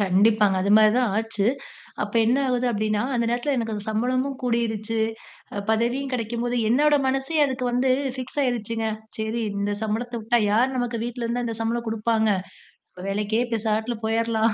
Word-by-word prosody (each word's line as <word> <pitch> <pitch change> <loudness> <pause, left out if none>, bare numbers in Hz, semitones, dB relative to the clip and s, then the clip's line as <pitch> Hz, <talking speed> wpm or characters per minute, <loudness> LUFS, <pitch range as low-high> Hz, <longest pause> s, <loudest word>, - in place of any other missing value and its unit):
கண்டிப்பாங்க. 205 +1 +3
அதுமாரி 215 +2 +6
தான் 240 -6 +1
ஆச்சு. 220 -2 -1 0.6
அப்ப 205 0 -4
என்ன 245 - +3
ஆவுது 250 0 +1
அப்பிடின்னா, 215 -1 0
அந்த 235 -1 +1
நேரத்தில 245 +4 0
எனக்கு 225 -3 -2
அந்த 205 - -5
சம்பளமும் 255 +5 0
கூடிருச்சு, 225 -2 -1 0.6
அ 205 - -3
பதவியும் 245 +5 0
கிடைக்கும்போது 240 +1 -2
என்னோட 290 +5 +4
மனசே 270 +4 0
அதுக்கு 260 -1 -3
வந்து 255 +2 +2 0.3
ஃபிக்ஸ் 260 +2 -6
ஆகிருச்சுங்க, 230 -2 -1 0.3
சரி, 220 +2 -2 0.2
இந்த 205 0 0
சம்பளத்த 225 +3 -2
விட்டா, 235 +2 +2
யாரு 240 +5 +3
நமக்கு 240 -2 -2
வீட்ல 240 0 -4
இருந்தா 240 +1 -1
அந்த 230 -1 -3
சம்பளம் 235 +1 -1
குடுப்பாங்க? 220 0 +1 0.8
வேலைக்கே 210 +3 0
இப்ப 240 - -6
பேசாம 220 +2 -1
போயிர்லாம் 225 0 +1
230 Hz, 155 wpm, -24 LUFS, 220-245 Hz, 0.8 s, அதுமாரி